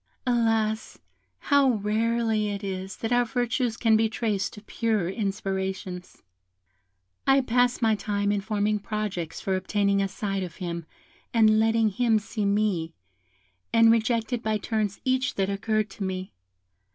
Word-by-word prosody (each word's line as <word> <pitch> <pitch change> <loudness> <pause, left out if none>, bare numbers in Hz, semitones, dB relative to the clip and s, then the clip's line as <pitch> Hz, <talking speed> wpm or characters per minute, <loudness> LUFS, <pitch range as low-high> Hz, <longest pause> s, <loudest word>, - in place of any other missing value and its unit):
Alas! 225 -3 +1 0.4
how 280 -2 +3
rarely 220 0 0
it 200 0 -4
is 190 -1 -5
that 225 - -4
our 245 0 +4
virtues 245 0 -1
can 225 -2 +3
be 220 0 +3
traced 215 -4 -1
to 210 - -12
purer 220 -5 -1
inspirations. 190 -2 -4 1.0
"I 270 0 +5
passed 245 0 +1
my 220 -1 +4
time 205 0 -1
in 205 -1 0
forming 210 0 0
projects 205 -6 -4
for 190 - 0
obtaining 200 +1 +1
a 195 - +1
sight 195 0 -3
of 180 -3 -6
him, 170 -3 -5 0.5
and 215 -1 +5
letting 225 0 +3
him 225 +2 +2
see 210 0 -3
me, 200 -5 0 0.8
and 230 0 +6
rejected 230 +1 +1
by 215 -1 0
turns 210 -1 -2
each 260 0 +1
that 195 0 0
occurred 215 +1 -1
to 200 - -6
me. 190 0 -4
215 Hz, 145 wpm, -26 LUFS, 195-230 Hz, 1.0 s, and